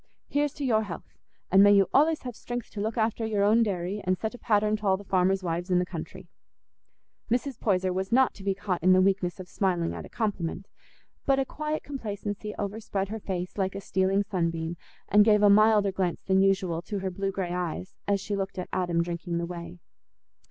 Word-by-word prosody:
Here's 290 0 0
to 285 - -3
your 220 -4 +3
health, 200 -5 -8 0.4
and 190 +1 +7
may 205 0 +7
you 195 -2 +5
allays 310 +3 +3
have 245 -3 -6
strength 245 +1 -6
to 205 - -5
look 220 +2 -2
after 225 0 0
your 215 -2 0
own 215 +3 +5
dairy, 195 -1 -1
and 185 0 +1
set 220 +5 -3
a 245 - -10
pattern 210 0 +2
t' 215 - -7
all 190 -2 +3
the 200 - -10
farmers' 190 0 +1
wives 175 +1 -2
in 180 - +3
the 180 - +2
country." 170 -3 -8 1.0
Mrs. 250 +2 -1
Poyser 185 -3 +1
was 190 +1 -3
not 260 +2 +4
to 195 - -12
be 195 -1 0
caught 185 -3 -2
in 185 +1 +5
the 185 - +5
weakness 190 -2 0
of 185 - -8
smiling 175 -3 0
at - - -6
a - - -11
compliment, 195 -4 -3 0.6
but 270 -1 +4
a 270 - +1
quiet 305 +3 -3
complacency 210 -5 -5
over 205 +2 -3
spread 195 -3 -3
her 220 +1 -4
face 185 -1 -4
like 190 0 0
a - - -3
stealing 195 +1 +1
sunbeam, 170 -4 -2 0.3
and 210 +1 +6
gave 210 -1 +4
a 205 - +7
milder 210 -1 +5
glance 185 -2 -2
than 190 0 +3
usual 190 -4 +1
to 205 +3 -5
her 190 -1 -3
blue 195 +2 -2
grey 185 -2 -3
eyes, 180 +1 -4
as 200 -1 +2
she 205 +1 -3
looked 195 0 -3
at 180 - -4
Adam 175 -2 +1
drinking 170 0 -4
the 170 - -1
whey. 170 0 -7
195 Hz, 220 wpm, -27 LUFS, 180-215 Hz, 1.0 s, and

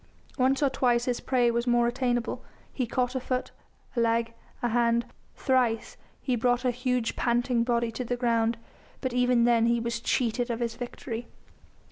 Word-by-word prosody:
Once 265 +2 +2
or 280 - +4
twice 245 -2 +2
his 245 -2 -1
prey 245 -2 +2
was 235 +1 -1
more 240 0 +4
attainable. 240 -1 -1 0.3
He 255 -3 -1
caught 250 +1 0
a 260 - -1
foot, 255 0 -3 0.4
a - - 0
leg, 230 0 +1 0.3
a 240 - +2
hand; 235 0 +2 0.3
thrice 250 -4 +1 0.2
he 255 - -1
brought 245 +2 +1
a 250 - +3
huge, 250 -1 -1
panting 240 0 +1
body 235 -1 0
to 225 +3 -4
the 245 0 -2
ground, 230 -1 +1 0.4
but 260 -2 -3
even 250 -1 +3
then 235 -1 +4
he 235 0 +2
was 235 0 -2
cheated 245 0 0
of 235 -1 -2
his 235 -1 -1
victory. 240 -1 -6
240 Hz, 175 wpm, -27 LUFS, 235-250 Hz, 0.4 s, or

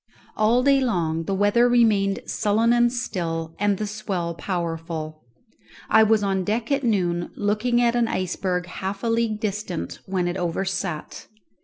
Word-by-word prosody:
All 230 +4 +3
day 275 0 +4
long 165 -9 0
the 195 - -1
weather 205 +5 +3
remained 210 -5 +3
sullen 220 +3 +2
and 240 0 +3
still, 165 -9 -3
and 205 -1 +2
the 215 - -2
swell 200 -5 -3
powerful. 165 -3 -4 0.7
I 220 - +7
was 220 -1 +4
on 195 -1 0
deck 225 +6 -2
at 280 0 +2
noon, 180 -7 0
looking 215 +4 +1
at 240 0 +2
an 240 -1 +2
iceberg 180 -2 -2
half 195 +2 -5
a - - 0
league 230 -2 0
distant 205 -5 -4
when 185 -2 0
it 175 +2 -2
overset. 180 -1 -3
200 Hz, 155 wpm, -23 LUFS, 175-230 Hz, 0.7 s, I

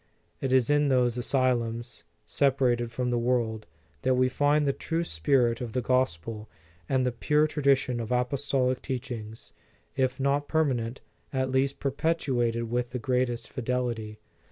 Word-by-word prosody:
It 135 - -2
is 130 0 +3
in 145 0 +3
those 125 -3 +2
asylums, 120 -2 -1 0.2
separated 125 -4 +1
from 125 +1 -1
the 120 - +1
world, 115 -3 0 0.3
that 130 -1 +2
we 130 0 +3
find 145 +2 +2
the 140 - +2
true 165 +4 -2
spirit 120 - +1
of 120 -3 -5
the 125 - 0
Gos 130 -8 +2
pel 110 +5 -8 0.4
and 130 -1 +2
the 125 - +1
pure 150 +6 +2
tradition 135 -5 +1
of 115 0 -5
apostolic 130 +1 0
teach 130 -2 -4
ings, 110 -1 -8 0.4
if 130 0 0
not 140 +1 +1
permanent, 130 -6 0 0.3
at 130 -1 -1
least 135 +1 +1
perpetuated 135 -5 0
with 120 +1 -2
the - - -1
greatest 125 0 -1
fidelity. 120 -4 -2
125 Hz, 155 wpm, -28 LUFS, 120-135 Hz, 0.4 s, is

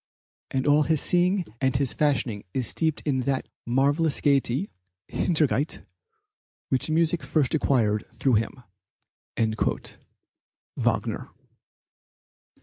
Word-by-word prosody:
And 130 0 -1
all 145 +1 +5
his 155 0 +2
seeing 180 +3 +2 0.2
and 130 0 +2
his 135 -1 +1
fashioning 130 -8 0
is 130 - 0
steeped 160 +5 -1
in 140 -3 +1
that 130 +1 -1 0.2
marvellous 140 +5 +2
gayety 140 - +1 0.4
(Heiterkeit) 150 -4 +1 0.8
which 130 +3 0
music 165 +1 +2
first 150 -5 +1
acquired 115 -9 +2
through 120 -3 +3
him." 110 0 -6 1.2
(Wagner.) - - -1
140 Hz, 100 wpm, -26 LUFS, 125-155 Hz, 1.2 s, all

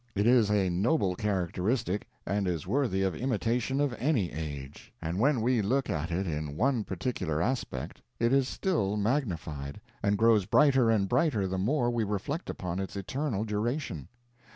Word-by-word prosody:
It 100 +1 +1
is 120 -3 +5
a 100 -2 +2
noble 95 - +1
characteristic 100 +2 -1 0.2
and 100 0 0
is 85 -4 -2
worthy 120 -9 +1
of 95 - +1
imitation 125 +1 0
of 145 -3 +1
any 120 - +1
age. 75 -3 -7
And 85 +3 -3
when 130 0 +3
we 120 0 +2
look 125 +4 0
at 80 -2 -2
it 90 +3 -1
in 75 -3 -3
one 125 -2 +2
particular 95 -5 -2
aspect, 125 +9 -2 0.2
it 115 +2 +2
is 135 -2 +3
still 105 - 0
magnified, 85 - -2 0.2
and 100 0 +2
grows 110 -4 +4
brighter 135 -5 +5
and 105 -3 +2
brighter 120 - +2
the 95 0 -2
more 120 +4 +1
we 120 -2 0
reflect 105 - -3
upon 90 0 -3
its 95 +1 -4
eternal 115 +2 -2
duration. 105 - -2
105 Hz, 165 wpm, -29 LUFS, 90-125 Hz, 0.2 s, is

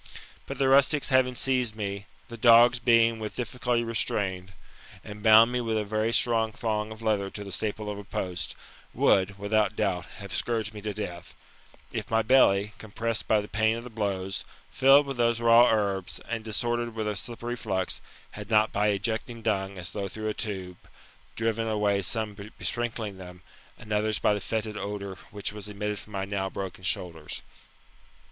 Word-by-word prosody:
But - - -5
the 135 - +2
rustics 140 +2 +4
having 130 -1 +3
seized 125 -4 +1
me, 100 -2 -4 0.2
the 115 - -8
dogs 120 +1 +6
being 115 -1 +4
with 110 -1 -5
difficulty 125 0 -1
restrained, 95 -5 -1 0.5
and 105 -1 -9
bound 110 +2 +7
me 125 0 0
with 115 -2 -1
a 105 - 0
very 110 +2 0
strong 115 -2 +2
thong 110 -2 -2
of 110 +1 -9
leather 105 -3 +1
to 105 - -7
the 100 - -8
staple 105 0 -3
of 105 -1 -4
a - - -8
post, 90 -3 -4 0.4
would, 95 +1 +3
without 105 0 +1
doubt, 90 -4 0
have 100 -3 -8
scourged 110 -2 -1
me 105 - -8
to 105 0 -3
death; 90 -5 -6 0.6
if - - -4
my 115 0 +2
belly, 105 -4 +4
compressed 110 +1 -3
by 110 -1 +3
the 105 - -8
pain 110 +1 +1
of 115 - -7
the 125 - -9
blows, 95 -3 -2 0.3
filled 135 - +6
with 135 -2 -5
those 120 -1 +2
raw 115 +1 +6
herbs, 100 -4 0
and 115 -1 -3
disordered 120 +1 -1
with 110 -1 -2
a 105 - -1
slippery 120 +3 -4
flux, 95 -5 -2 0.3
had 105 0 -9
not 110 -1 +4
by 105 +1 +1
ejecting 115 +3 -2
dung, 100 -3 -1
as 90 -2 -6
through 105 +2 -4
a 110 - 0
tube, 95 -5 -5 0.6
driven 115 0 -1
away 105 -2 +1
some 110 +2 -1
by 100 +1 -10
besprinUing 115 -4 -3
them, 90 -1 -11 0.3
and 105 - -6
other 105 +1 +1
by - - +3
the 105 - -2
fetid 110 +1 -3
odour 100 -1 -5
which 100 0 -4
was 105 -1 -7
emitted 105 0 -3
from 105 0 -14
my 95 -1 -2
now 95 -1 -2
broken 95 -1 -6
shoulders. 85 -4 -3
110 Hz, 180 wpm, -27 LUFS, 100-115 Hz, 0.6 s, bound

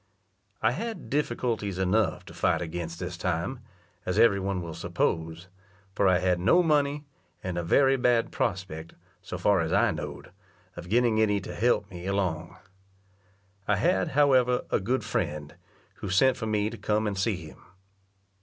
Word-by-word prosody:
I - - +4
had 230 -1 -5
difficulties 120 -8 -1
enough 95 +3 +1
to - - -12
fight - - +1
against 85 0 -5
this 85 - -5
time, 90 +8 -2 0.4
as 90 +2 -2
every 110 -3 +5
one 95 -1 -2
will 85 -1 -6
suppose; 80 +2 -2 0.5
for 100 - +2
I 90 -1 +5
had 90 -1 +1
no 95 - +4
money, 145 -2 +1 0.4
and 90 -2 -3
a 85 - -1
very 135 +11 +3
bad 120 -2 +2
prospect, 85 -4 -3 0.3
so - - -6
far 100 -2 +3
as 80 - -2
I - - +3
know'd, - - -7 0.4
of 85 0 -9
getting 115 0 +3
any 105 -2 +2
to - - -7
help 105 -4 +1
me 90 0 -7
along. 90 -3 -2 1.1
I 105 - +3
had, 95 -2 +2
however, 130 -4 +4
a - - +2
good 125 +7 -1
friend, 75 -1 -3 0.4
who 100 - -6
sent 130 +7 +4
for 110 - -4
me 105 0 0
to 115 - -9
come 105 +1 0
and 105 -2 -1
see 100 +2 0
him. 80 -4 -11
100 Hz, 165 wpm, -27 LUFS, 90-120 Hz, 1.1 s, every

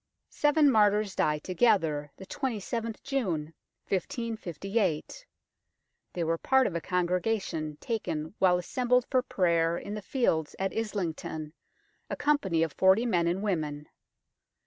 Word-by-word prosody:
Seven 295 -1 +4
martyrs 210 -3 +3
die 150 0 +2
together, 160 -5 +1
the 190 - -10
27th 230 -2 -3
June 180 - -2 0.3
1558. 210 - -2 0.9
They 175 - -2
were 165 0 0
part 265 0 +3
of - - -1
a 170 - -2
congregation 180 -3 -1
taken 170 -8 -3
while 180 -2 +5
assembled 250 +7 +1
for 260 -2 +4
prayer 170 -7 +1
in 205 - -6
the 210 - -4
fields 180 - 0
at 195 0 -2
Islington, 165 -8 -3 0.6
a - - -2
company 195 - +1
of 160 -3 -2
forty 190 +5 +4
men 175 -7 +2
and 180 +4 -1
women. 150 -7 -2
190 Hz, 125 wpm, -29 LUFS, 165-230 Hz, 0.9 s, while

